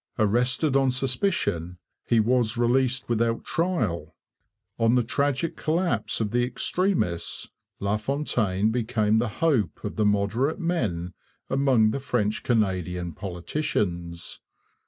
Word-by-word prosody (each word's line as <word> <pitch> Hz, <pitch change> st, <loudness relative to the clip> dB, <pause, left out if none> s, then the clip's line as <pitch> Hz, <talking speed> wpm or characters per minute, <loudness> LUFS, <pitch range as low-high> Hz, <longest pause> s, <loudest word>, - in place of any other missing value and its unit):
Arrested 125 Hz, +7 st, +2 dB
on 135 Hz, -1 st, +4 dB
suspicion, 125 Hz, -, 0 dB, 0.3 s
he 115 Hz, -, +4 dB
was 120 Hz, 0 st, +2 dB
released 125 Hz, +2 st, +2 dB
without 115 Hz, 0 st, 0 dB
trial. 110 Hz, -, -1 dB, 0.6 s
On 115 Hz, +2 st, +4 dB
the 125 Hz, -, +3 dB
tragic 140 Hz, +6 st, 0 dB
collapse 155 Hz, -, 0 dB
of 105 Hz, -2 st, -1 dB
the 120 Hz, +1 st, +2 dB
extremists 125 Hz, -, -1 dB, 0.3 s
LaFontaine 105 Hz, -1 st, 0 dB
became 110 Hz, -2 st, +1 dB
the 120 Hz, 0 st, 0 dB, 0.2 s
hope 115 Hz, -, +1 dB
of -, -, -5 dB
the 110 Hz, -, +2 dB
moderate 105 Hz, -, +1 dB
men 105 Hz, -, -1 dB, 0.4 s
among 130 Hz, -5 st, +3 dB
the 140 Hz, -, -2 dB
French 115 Hz, -5 st, -1 dB
Canadian 90 Hz, -6 st, 0 dB
politicians. 85 Hz, -, -3 dB
115 Hz, 115 wpm, -26 LUFS, 100-135 Hz, 0.6 s, on